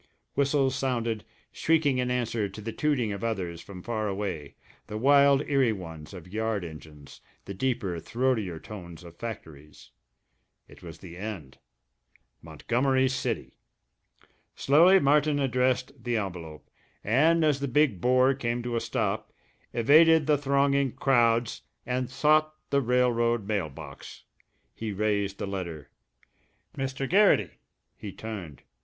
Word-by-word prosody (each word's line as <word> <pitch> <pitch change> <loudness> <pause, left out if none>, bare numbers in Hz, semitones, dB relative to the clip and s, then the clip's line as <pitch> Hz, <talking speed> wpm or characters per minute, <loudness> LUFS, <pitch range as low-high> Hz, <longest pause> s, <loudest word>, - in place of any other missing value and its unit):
Whistles 140 -1 +2
sounded, 115 -5 -1 0.3
shrieking 155 -5 +1
in 125 0 0
answer 115 -4 -1
to 95 - -10
the 110 +2 -5
tooting 130 -5 0
of 100 +1 -5
others 90 -7 -3
from 90 -2 -11
far 110 -3 -2
away, 95 -8 -4 0.3
the 105 -1 -5
wild 140 +3 +5
eerie 135 -5 +2
ones 80 -6 -8
of 90 -3 -10
yard 110 -3 -1
engines, 75 -3 -12 0.2
the 100 - -6
deeper, 100 -5 -2
throatier 110 -3 -1
tones 85 -5 -10
of 85 -1 -12
factories. 80 - -9 0.8
It - - -17
was 85 -2 -10
the 85 -2 -11
end. 90 -10 -7 0.8
Montgomery 125 - 0
City! 130 - -3 1.0
Slowly 170 +7 +5
Martin 145 0 +3
addressed 130 -1 0
the 120 -1 0
envelope, 85 -6 -6 0.4
and 155 +9 +3
as 145 -3 +2
the 140 - -2
big 130 - +2
bore 130 +2 +4
came 120 -2 -3
to 120 -1 -3
a 115 - 0
stop, - - -2 0.4
evaded 155 +6 +5
the 150 - +4
thronging 140 -1 +1
crowds 120 -3 +2 0.2
and 125 -1 -2
sought 155 +3 +2 0.2
the 140 - +3
railroad 120 -3 +1
mail 100 -7 -1
box. 70 -1 -11 0.5
He 110 -1 -5
raised 100 -1 -1
the - - -3
letter.... 90 -6 -6 0.8
"Mr. 135 0 -3
Garrity!" 180 - +4 0.4
He 100 - -8
turned. 95 - -8
115 Hz, 135 wpm, -27 LUFS, 95-135 Hz, 1.0 s, wild